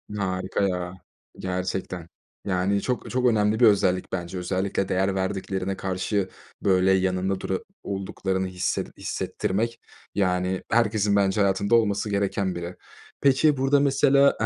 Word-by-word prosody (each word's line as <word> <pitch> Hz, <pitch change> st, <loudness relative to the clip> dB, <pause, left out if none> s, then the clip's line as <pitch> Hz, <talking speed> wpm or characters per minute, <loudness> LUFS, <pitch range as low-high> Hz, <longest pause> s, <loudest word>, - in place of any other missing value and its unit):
Harika 95 Hz, 0 st, -1 dB
ya, 90 Hz, -1 st, -3 dB, 0.5 s
gerçekten. 90 Hz, -2 st, -3 dB, 0.4 s
Yani, 100 Hz, +1 st, +1 dB
çok 125 Hz, -1 st, -2 dB
çok 125 Hz, 0 st, 0 dB
önemli 110 Hz, -2 st, +3 dB
bir 120 Hz, -, +7 dB
özellik 95 Hz, -3 st, +3 dB
bence. 90 Hz, 0 st, -4 dB
Özellikle 95 Hz, +2 st, -1 dB
değer 95 Hz, +1 st, +1 dB
verdiklerine 95 Hz, 0 st, -2 dB
karşı, 95 Hz, +1 st, -1 dB, 0.3 s
böyle, 95 Hz, -1 st, +3 dB
yanında 95 Hz, 0 st, +1 dB
dura 95 Hz, 0 st, -2 dB, 0.2 s
olduklarını 95 Hz, -1 st, -2 dB
hisset 90 Hz, 0 st, -3 dB
hissettirmek, 115 Hz, +5 st, -2 dB, 0.4 s
yani, 90 Hz, -1 st, 0 dB
herkesin 110 Hz, -3 st, +2 dB
bence 100 Hz, 0 st, +2 dB
hayatında 100 Hz, +2 st, +2 dB
olması 105 Hz, -2 st, +2 dB
gereken 100 Hz, -2 st, 0 dB
biri. 85 Hz, +1 st, -5 dB, 0.5 s
Peki, 140 Hz, +2 st, +4 dB
burada 135 Hz, +2 st, +3 dB
mesela 140 Hz, 0 st, +4 dB
95 Hz, 125 wpm, -25 LUFS, 95-105 Hz, 0.5 s, bir